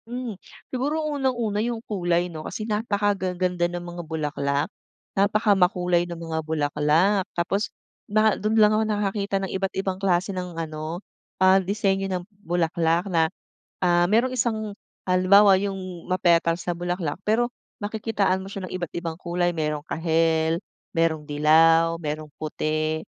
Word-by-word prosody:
Hmm, 245 Hz, -1 st, -4 dB, 0.4 s
siguro 295 Hz, +5 st, -1 dB
unang-una 250 Hz, -8 st, 0 dB
yung 235 Hz, +1 st, -1 dB
kulay, 175 Hz, -4 st, 0 dB
'no? 165 Hz, -3 st, -7 dB
Kasi 215 Hz, +7 st, -5 dB
napakagaganda 190 Hz, -5 st, 0 dB
ng 175 Hz, 0 st, -5 dB
mga 175 Hz, 0 st, -6 dB
bulaklak, 150 Hz, -2 st, -2 dB, 0.4 s
napakamakulay 190 Hz, -4 st, +2 dB
ng 170 Hz, -, -5 dB
mga 165 Hz, -1 st, -3 dB
bulaklak. 155 Hz, +5 st, +2 dB
Tapos 195 Hz, +5 st, 0 dB, 0.4 s
naha 215 Hz, 0 st, +4 dB
do'n 215 Hz, +2 st, 0 dB
lang 215 Hz, -1 st, +6 dB
ako 215 Hz, +1 st, +2 dB
nakakita 200 Hz, -1 st, -1 dB
ng 195 Hz, -1 st, -3 dB
iba't 190 Hz, 0 st, -2 dB
ibang 190 Hz, 0 st, -2 dB
klase 190 Hz, 0 st, +1 dB
ng 180 Hz, -2 st, -5 dB
ano, 160 Hz, +2 st, -5 dB, 0.3 s
ah, 190 Hz, +1 st, +5 dB
disenyo 195 Hz, 0 st, 0 dB
ng 180 Hz, -2 st, -3 dB, 0.2 s
bulaklak 170 Hz, -1 st, +1 dB
na, 160 Hz, -1 st, +3 dB, 0.5 s
ah, 175 Hz, -1 st, +3 dB
merong 235 Hz, +7 st, +2 dB
isang 220 Hz, -4 st, -1 dB, 0.3 s
halimbawa 190 Hz, +2 st, +6 dB
yung 195 Hz, 0 st, -2 dB, 0.2 s
ma-petals 170 Hz, -2 st, +2 dB
na 175 Hz, -, 0 dB
bulaklak, 175 Hz, -3 st, -2 dB
pero 230 Hz, +3 st, +2 dB, 0.3 s
makikitaan 205 Hz, -3 st, -1 dB
mo 195 Hz, -, -9 dB
siya 190 Hz, -2 st, -5 dB
ng -, -, -11 dB
iba't 175 Hz, -3 st, -5 dB
ibang 170 Hz, -2 st, -4 dB
kulay 175 Hz, 0 st, -1 dB
mayroong 150 Hz, -2 st, -1 dB
kahel, 160 Hz, 0 st, +1 dB, 0.3 s
merong 165 Hz, -2 st, +1 dB
dilaw, 165 Hz, +3 st, +4 dB
merong 155 Hz, -1 st, -4 dB
puti. 155 Hz, 0 st, -1 dB
180 Hz, 140 wpm, -24 LUFS, 165-205 Hz, 0.5 s, lang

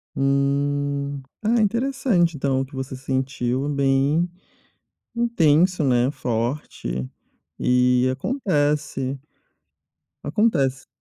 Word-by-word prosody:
Hum. 140 Hz, 0 st, 0 dB, 0.2 s
Ah, 230 Hz, +3 st, +2 dB
interessante, 220 Hz, -, +1 dB
então, 135 Hz, -1 st, 0 dB
o 135 Hz, -, -2 dB
que 140 Hz, -, -17 dB
você 130 Hz, 0 st, -5 dB
sentiu, 130 Hz, 0 st, -2 dB
bem 140 Hz, +4 st, +2 dB, 0.9 s
intenso, 180 Hz, -7 st, +3 dB
né, 125 Hz, -2 st, +3 dB
forte. 115 Hz, -, -3 dB, 0.5 s
E 125 Hz, 0 st, +3 dB
acontece 145 Hz, -, -1 dB, 1.0 s
acontece. 140 Hz, -, +1 dB
140 Hz, 80 wpm, -23 LUFS, 130-165 Hz, 1.0 s, intenso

